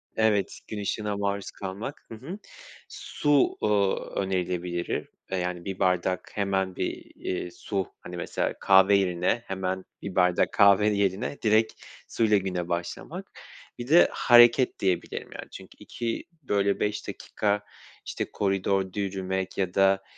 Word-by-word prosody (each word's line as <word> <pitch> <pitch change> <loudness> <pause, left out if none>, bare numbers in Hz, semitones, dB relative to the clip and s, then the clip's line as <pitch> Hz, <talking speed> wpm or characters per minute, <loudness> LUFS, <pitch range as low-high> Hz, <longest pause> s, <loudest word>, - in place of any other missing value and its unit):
Evet. 110 -3 +1
Gün 105 -1 -5
ışığına 105 0 -2
maruz 100 -1 -2
kalmak. 100 +9 -7
Hı - - -5
hı. 155 - -8 0.5
Su, 145 -2 +1
ııı, 100 -2 +3 0.2
önerilebilir 90 -2 -2 0.2
e 95 - -1
yani 90 -1 -3
1 95 -1 -5
bardak 90 -1 0
hemen 95 -2 -1
bir, - - -4
iii, 90 -1 -4
su. 95 -1 -3
Hani 90 0 -8
mesela 85 - -2
kahve 95 +1 +6
yerine 95 +4 +1
hemen 95 0 -3 0.2
bir 95 -2 -6
bardak 90 -1 +3
kahve 100 0 +6
yerine 100 +6 0
direkt 110 0 +3 0.3
suyla 110 -2 +3
güne 90 -3 -3
başlamak. 85 0 -5 0.5
Bir 120 - -5
de 165 +5 +7
hareket 120 +1 +5
diyebilirim. 90 -3 -1
Yani - - -9
çünkü - - -12
2, 115 -1 -4 0.2
böyle, 100 -4 +1
5 105 0 -2
dakika, 105 -1 -2 0.4
işte, - - -4
koridorda 95 -1 0
yürümek 95 -1 -3
ya 95 -2 -1
da, 95 0 +3
95 Hz, 135 wpm, -27 LUFS, 95-105 Hz, 0.5 s, de